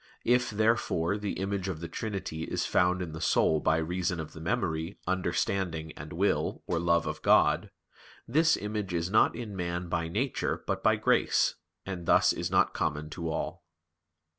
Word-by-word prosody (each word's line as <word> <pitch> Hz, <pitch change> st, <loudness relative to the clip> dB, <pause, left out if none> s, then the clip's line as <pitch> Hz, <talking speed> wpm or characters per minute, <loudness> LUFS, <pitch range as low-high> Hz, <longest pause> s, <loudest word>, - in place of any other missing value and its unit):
If, 125 Hz, +1 st, +3 dB
therefore, 105 Hz, -4 st, +1 dB
the 105 Hz, -1 st, -3 dB
image 95 Hz, 0 st, -2 dB
of 90 Hz, -5 st, -3 dB
the 85 Hz, -, -5 dB
Trinity 95 Hz, -4 st, -4 dB
is -, -, -2 dB
found 90 Hz, +1 st, +2 dB
in 85 Hz, -, -6 dB
the 80 Hz, +1 st, -7 dB
soul 80 Hz, -1 st, +3 dB
by 80 Hz, +1 st, +2 dB
reason 85 Hz, +1 st, -1 dB
of 80 Hz, -, -6 dB
the 80 Hz, -, -10 dB
memory, 85 Hz, -3 st, -2 dB
understanding, 90 Hz, -2 st, -1 dB
and 75 Hz, +1 st, -10 dB
will 95 Hz, +5 st, 0 dB
or 85 Hz, -, -1 dB
love 85 Hz, 0 st, +2 dB
of -, -, -4 dB
God, -, -, +4 dB, 0.6 s
this 160 Hz, +6 st, +3 dB
image 105 Hz, -3 st, -3 dB
is 85 Hz, +2 st, -1 dB
not 110 Hz, -, +4 dB
in 115 Hz, -4 st, -6 dB
man 85 Hz, -1 st, -3 dB
by 85 Hz, -1 st, -1 dB
nature 115 Hz, +10 st, -2 dB
but -, -, -2 dB
by -, -, +4 dB
grace, -, -, +2 dB, 0.3 s
and 90 Hz, -3 st, -6 dB
thus -, -, +5 dB
is -, -, -3 dB
not -, -, +3 dB
common 75 Hz, +1 st, -2 dB
to 85 Hz, 0 st, -4 dB
all. -, -, -4 dB
90 Hz, 175 wpm, -29 LUFS, 80-100 Hz, 0.6 s, thus